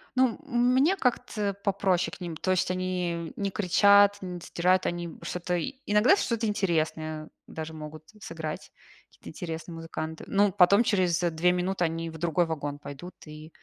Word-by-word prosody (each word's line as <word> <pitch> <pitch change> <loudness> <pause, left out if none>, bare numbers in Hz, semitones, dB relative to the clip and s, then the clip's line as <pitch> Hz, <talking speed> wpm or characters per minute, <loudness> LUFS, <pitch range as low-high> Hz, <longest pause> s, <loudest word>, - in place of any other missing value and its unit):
ну, 255 -3 +3
мне 260 +6 +3
как-то 245 - -1
попроще 190 -3 +1
к - - -18
ним. 170 -2 -5
То 185 - -1
есть, 185 -1 +1
они 180 -3 -2
не 200 -1 -2
кричат, 200 +1 +5
не 180 -2 -6
сдирают, 180 +2 +1
они 175 -1 -3
что-то. 180 0 -2 0.3
Иногда 210 - +5
что-то 230 - -1
интересное 155 -6 -1 0.2
даже 160 0 -7
могут 155 0 -9 0.2
сыграть, 160 -3 -6 0.4
какие-то - - -13
интересные 165 +1 -6
музыканты, 160 -1 -6
но 200 0 +3
потом 200 +3 +5
через 185 -6 +2
2 175 0 +2
минуты 180 +1 -1
они 165 0 -2
в 160 - -9
другой 170 +1 +1
вагон 145 -3 -4
пойдут 145 +5 -9
и 155 0 -11
180 Hz, 155 wpm, -27 LUFS, 160-200 Hz, 0.4 s, кричат